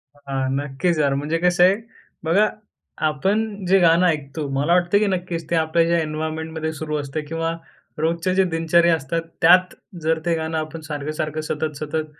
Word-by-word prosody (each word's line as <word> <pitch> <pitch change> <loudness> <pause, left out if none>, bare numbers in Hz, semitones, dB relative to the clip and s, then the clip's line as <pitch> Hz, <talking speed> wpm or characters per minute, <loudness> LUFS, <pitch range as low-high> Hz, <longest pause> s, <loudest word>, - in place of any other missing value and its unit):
हां, 135 -2 -3
नक्कीच 145 +5 -1
यार 140 -2 +2
म्हणजे 150 +4 -1
कसं 175 0 +4
आहे, 185 +2 +6 0.5
बघा 195 +7 +3 0.6
आपण 200 +7 -1
जे 190 +2 +4
गाणं 170 0 +5
ऐकतो, 150 -2 -2
मला 145 +5 +2
वाटतं 175 +2 +3
की 215 - +2
नक्कीच 175 -4 -3
ते 170 - +1
आपल्या 160 +1 +2
ज्या 170 0 +2
एन्व्हायर्नमेंटमध्ये 160 +1 -3
सुरू 155 0 -3
असतं 145 +1 -4
किंवा 165 +1 -2 0.5
रोजचे 165 +3 0
जे 190 - +4
दिनचर्या 165 +1 +3
असतात 160 +2 -3 0.2
त्यात 180 +2 +6 0.3
जर 160 +1 +1
ते 170 -1 +2
गाणं 160 0 -2
आपण 155 +1 -5
सारखं-सारखं, 155 0 -4
सतत-सतत, 155 0 -3
160 Hz, 160 wpm, -22 LUFS, 155-170 Hz, 0.6 s, आहे